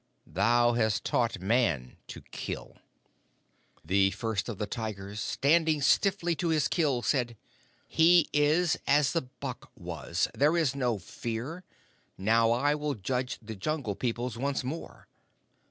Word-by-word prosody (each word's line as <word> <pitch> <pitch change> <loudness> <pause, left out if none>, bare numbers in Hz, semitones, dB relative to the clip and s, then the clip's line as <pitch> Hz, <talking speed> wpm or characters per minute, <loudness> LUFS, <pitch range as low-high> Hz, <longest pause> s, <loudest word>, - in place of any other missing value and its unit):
Thou 120 +2 +3
hast 110 -3 +1
taught 115 -5 0
Man 95 - +1
to - - -9
kill!' - - -6 1.1
"The 95 +3 +3
First 105 +3 -3
of 110 - -5
the 105 - -2
Tigers, 105 -2 -5
standing 155 +6 +2
stiffly 175 +4 +2
to 175 - -1
his 155 -3 +2
kill, 140 -8 0
said: 120 -5 0 0.5
'He 170 +1 +5
is 150 +3 +3
as 145 0 +3
the 165 - +1 0.2
buck 130 -3 -6
was. 85 -1 -2
There 150 +4 +3
is 155 -5 +2
no 125 -5 0
Fear. 120 - -6 0.5
Now 115 +4 +3
I 130 +5 +2
will 150 -1 -2
judge 125 +5 -2
the 110 0 -7
Jungle 125 +1 -2
Peoples 120 0 -3
once 140 0 -1
more." 145 +6 -7
125 Hz, 140 wpm, -29 LUFS, 110-150 Hz, 1.1 s, He